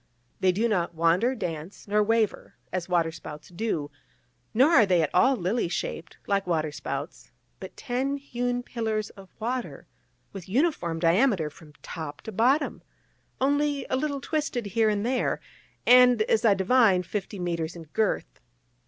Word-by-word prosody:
They 185 Hz, -, +4 dB
do 215 Hz, +6 st, +1 dB
not 175 Hz, -6 st, -1 dB
wander, 175 Hz, +10 st, +2 dB
dance, 165 Hz, -3 st, -6 dB
nor 210 Hz, +1 st, +2 dB
waver, 220 Hz, 0 st, 0 dB, 0.2 s
as 185 Hz, -1 st, -3 dB
waterspouts 165 Hz, -3 st, -2 dB
do; 175 Hz, -6 st, -3 dB, 0.6 s
nor 260 Hz, +8 st, +4 dB
are 240 Hz, -10 st, +6 dB
they 180 Hz, -3 st, +3 dB
at 155 Hz, -, -2 dB
all 260 Hz, +9 st, +4 dB
lily 195 Hz, +3 st, 0 dB
shaped, 170 Hz, -1 st, -5 dB
like 200 Hz, -2 st, 0 dB
waterspouts: 155 Hz, -3 st, -3 dB, 0.3 s
but -, -, -10 dB
ten 270 Hz, +1 st, -2 dB
hewn 245 Hz, -3 st, -3 dB
pillars 220 Hz, -3 st, -3 dB
of 195 Hz, -1 st, -14 dB
water, 245 Hz, +3 st, -4 dB, 0.5 s
with 190 Hz, -2 st, -9 dB
uniform 220 Hz, -, 0 dB
diameter 170 Hz, -, +2 dB
from 155 Hz, -1 st, -16 dB
top 150 Hz, -3 st, -7 dB
to 220 Hz, -, -7 dB
bottom, 255 Hz, +8 st, +1 dB, 0.6 s
only 285 Hz, +1 st, +1 dB
a -, -, +3 dB
little 280 Hz, 0 st, -2 dB
twisted 290 Hz, -6 st, -2 dB
here 215 Hz, +2 st, +2 dB
and 205 Hz, 0 st, -1 dB
there, 255 Hz, +1 st, 0 dB, 0.5 s
and, 250 Hz, -2 st, +7 dB
as 220 Hz, +1 st, +1 dB
I 205 Hz, -3 st, +6 dB
divine, 195 Hz, -2 st, +4 dB
fifty 200 Hz, +3 st, -5 dB
mètres 170 Hz, -2 st, -3 dB
in 170 Hz, -, -8 dB
girth. 200 Hz, +7 st, -2 dB
210 Hz, 150 wpm, -26 LUFS, 175-245 Hz, 0.6 s, and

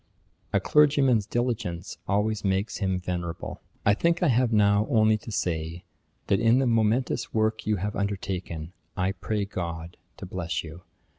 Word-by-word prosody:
A -, -, +3 dB
clergyman's 140 Hz, -7 st, +4 dB
diligence 110 Hz, -8 st, -2 dB
always 105 Hz, +1 st, 0 dB
makes 95 Hz, +2 st, 0 dB
him 95 Hz, -3 st, 0 dB
venerable. 90 Hz, -1 st, -4 dB, 0.2 s
I 100 Hz, -, +6 dB
think 170 Hz, -, +1 dB
I 170 Hz, -, +4 dB
have 125 Hz, -1 st, +3 dB
now 105 Hz, -1 st, +4 dB
only 110 Hz, -4 st, +4 dB
to 115 Hz, -, -9 dB
say, 85 Hz, -3 st, -2 dB, 0.4 s
that 100 Hz, -, +2 dB
in 115 Hz, +2 st, +4 dB
the 135 Hz, -, +2 dB
momentous 115 Hz, +2 st, +1 dB
work 110 Hz, 0 st, +1 dB
you 105 Hz, -, +3 dB
have 100 Hz, +2 st, -3 dB
undertaken, 95 Hz, -5 st, -3 dB, 0.2 s
I 90 Hz, +1 st, +1 dB
pray 100 Hz, +2 st, -2 dB
GOD 85 Hz, -3 st, -5 dB, 0.2 s
to -, -, -7 dB
bless 90 Hz, -2 st, -3 dB
you. 80 Hz, +2 st, -10 dB
100 Hz, 155 wpm, -27 LUFS, 90-115 Hz, 0.4 s, I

